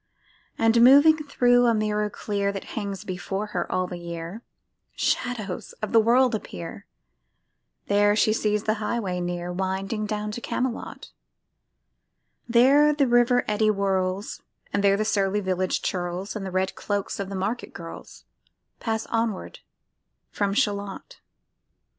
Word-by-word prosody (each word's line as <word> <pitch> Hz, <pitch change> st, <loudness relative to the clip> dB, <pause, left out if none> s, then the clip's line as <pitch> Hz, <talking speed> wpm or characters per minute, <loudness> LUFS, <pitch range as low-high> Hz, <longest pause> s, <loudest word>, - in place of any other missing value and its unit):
And 225 Hz, +1 st, +4 dB
moving 285 Hz, +6 st, +7 dB
thro' 245 Hz, -5 st, +3 dB
a 230 Hz, -, +3 dB
mirror 210 Hz, 0 st, 0 dB
clear 200 Hz, -1 st, -2 dB
That 195 Hz, -1 st, -6 dB
hangs 200 Hz, -3 st, -4 dB
before 195 Hz, +1 st, -4 dB
her 175 Hz, -1 st, -2 dB
all 185 Hz, 0 st, +1 dB
the 180 Hz, -1 st, -7 dB
year,[Pg 170 Hz, +5 st, -10 dB
69] 245 Hz, -, +1 dB
Shadows 195 Hz, -6 st, -6 dB
of 215 Hz, -, -6 dB
the 230 Hz, -, +6 dB
world 245 Hz, +3 st, +4 dB
appear, 200 Hz, -2 st, -6 dB, 1.0 s
There 205 Hz, 0 st, +3 dB
she 215 Hz, 0 st, +3 dB
sees 210 Hz, -1 st, 0 dB
the 215 Hz, -, +1 dB
highway 210 Hz, -5 st, -2 dB
near 175 Hz, 0 st, -3 dB
Winding 195 Hz, +3 st, -2 dB
down 210 Hz, 0 st, -3 dB
to 240 Hz, -, -6 dB
Camelot: 250 Hz, 0 st, -4 dB, 1.4 s
There 275 Hz, +6 st, +5 dB
the 285 Hz, -2 st, +3 dB
river 240 Hz, 0 st, +3 dB
eddy 215 Hz, +1 st, +1 dB
whirls, 195 Hz, -1 st, -1 dB, 0.3 s
And 200 Hz, -, +1 dB
there 200 Hz, 0 st, +4 dB
the 215 Hz, -, 0 dB
surly 200 Hz, -1 st, +1 dB
village 185 Hz, -1 st, -1 dB
churls, 180 Hz, +1 st, -3 dB
And 195 Hz, -2 st, -4 dB
the -, -, -3 dB
red 185 Hz, +1 st, -1 dB
cloaks 205 Hz, -1 st, -3 dB
of 195 Hz, -1 st, -3 dB
market 200 Hz, +5 st, -3 dB
girls, 165 Hz, -1 st, -10 dB, 0.5 s
Pass 220 Hz, -1 st, -2 dB
onward 225 Hz, -4 st, -2 dB, 0.7 s
from 200 Hz, -1 st, -1 dB
Shalott. 205 Hz, -, -2 dB
205 Hz, 140 wpm, -25 LUFS, 190-230 Hz, 1.4 s, moving